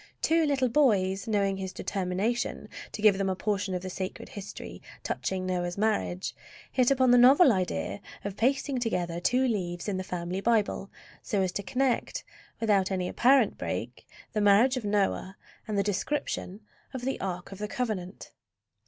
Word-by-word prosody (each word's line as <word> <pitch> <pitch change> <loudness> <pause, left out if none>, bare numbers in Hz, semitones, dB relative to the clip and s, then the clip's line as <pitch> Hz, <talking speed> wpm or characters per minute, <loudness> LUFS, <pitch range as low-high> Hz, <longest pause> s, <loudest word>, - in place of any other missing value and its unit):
Two 325 -1 +3
little 270 -3 +2
boys, 210 -7 +2
knowing 200 -3 +1
his 190 -1 -4
determination 195 +6 -2 0.2
to 210 - -7
give 200 -3 +6
them 195 -1 +1
a 190 - 0
portion 200 -1 -1
of 180 - -4
the 185 - -4
sacred 185 0 -5
history 200 -1 -8 0.2
touching 185 -1 -2
Noah's 180 -1 -2
marriage, 115 - -1 0.4
hit 250 -2 +3
upon 260 -2 +4
the 245 - +7
novel 265 +4 +7
idea 190 0 -2 0.2
of 200 -1 -3
pasting 265 +3 +1
together 175 -8 -1
two 255 +8 +2
leaves 175 -6 -2
in 200 -2 -1
the 185 - -3
family 180 +1 -4
Bible 210 -3 +1 0.3
so 200 -2 0
as 185 - 0
to 200 - -3
connect, 260 +4 -1 0.4
without 205 -4 +2
any 185 -2 -1
apparent 255 +1 +3
break, - - -4 0.3
the 215 - 0
marriage 205 +6 +5
of 255 - -3
Noah 195 -2 0 0.3
and 210 -2 -2
the 200 - +3
description 205 -1 -2 0.3
of 255 - -4
the 265 - -1
Ark 180 -1 -4
of 195 - -9
the 210 - -3
Covenant. 210 -6 -4
200 Hz, 170 wpm, -28 LUFS, 185-240 Hz, 0.4 s, the